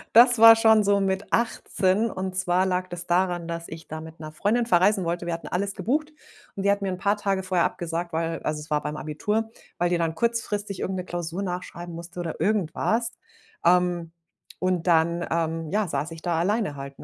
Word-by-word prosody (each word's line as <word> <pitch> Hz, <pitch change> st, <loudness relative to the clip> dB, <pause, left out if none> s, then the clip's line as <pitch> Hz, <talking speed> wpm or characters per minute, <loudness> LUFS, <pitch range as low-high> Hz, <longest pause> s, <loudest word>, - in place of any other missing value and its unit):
Das 240 Hz, -1 st, +7 dB
war 225 Hz, 0 st, +10 dB
schon 220 Hz, -1 st, +5 dB
so 200 Hz, 0 st, +3 dB
mit 195 Hz, 0 st, -1 dB
18 220 Hz, -2 st, +1 dB
und 185 Hz, 0 st, -4 dB
zwar 185 Hz, 0 st, +1 dB
lag 185 Hz, 0 st, -1 dB
das 175 Hz, 0 st, -7 dB
daran, 175 Hz, -1 st, +1 dB
dass 170 Hz, 0 st, -5 dB
ich 160 Hz, 0 st, -9 dB
da 155 Hz, 0 st, -6 dB
mit 160 Hz, 0 st, -11 dB
'ner 155 Hz, -1 st, -8 dB
Freundin 225 Hz, +8 st, +1 dB
verreisen 190 Hz, -1 st, +3 dB
wollte. 170 Hz, +1 st, -2 dB
Wir 170 Hz, -, -2 dB
hatten 165 Hz, -, -5 dB
alles 200 Hz, +2 st, -2 dB
gebucht 295 Hz, -, -1 dB, 0.4 s
und 195 Hz, -, -3 dB
die 200 Hz, -, +4 dB
hat 200 Hz, 0 st, +1 dB
mir 195 Hz, -, -1 dB
'n 180 Hz, -, -4 dB
paar 200 Hz, +2 st, +1 dB
Tage 195 Hz, -2 st, -1 dB
vorher 185 Hz, -2 st, +2 dB
abgesagt, 170 Hz, 0 st, -3 dB
weil 165 Hz, 0 st, -2 dB
also, 150 Hz, 0 st, -2 dB
es 150 Hz, +1 st, -10 dB
war 150 Hz, 0 st, +1 dB
beim 150 Hz, +1 st, -4 dB
Abitur, 210 Hz, +10 st, -2 dB, 0.3 s
weil 175 Hz, 0 st, +2 dB
die 175 Hz, -1 st, +1 dB
dann 165 Hz, -1 st, -1 dB
kurzfristig 210 Hz, -4 st, -1 dB
irgend 190 Hz, 0 st, -2 dB
'ne 180 Hz, -, -3 dB
Klausur 175 Hz, +2 st, -4 dB
nachschreiben 175 Hz, -1 st, -6 dB
musste 170 Hz, +1 st, -9 dB
oder 170 Hz, -2 st, -4 dB
irgendwas, 215 Hz, +4 st, 0 dB, 0.5 s
ähm, 175 Hz, -1 st, +2 dB, 0.5 s
und 185 Hz, -1 st, 0 dB
dann, 170 Hz, +1 st, +3 dB
ähm, 165 Hz, -1 st, -1 dB
ja, 210 Hz, 0 st, +1 dB
saß 150 Hz, +1 st, -3 dB
ich 165 Hz, 0 st, -10 dB
da 170 Hz, -2 st, 0 dB
alleine 205 Hz, -3 st, 0 dB
halt, 140 Hz, 0 st, -8 dB
ne? -, -, -11 dB
180 Hz, 210 wpm, -25 LUFS, 165-200 Hz, 0.5 s, war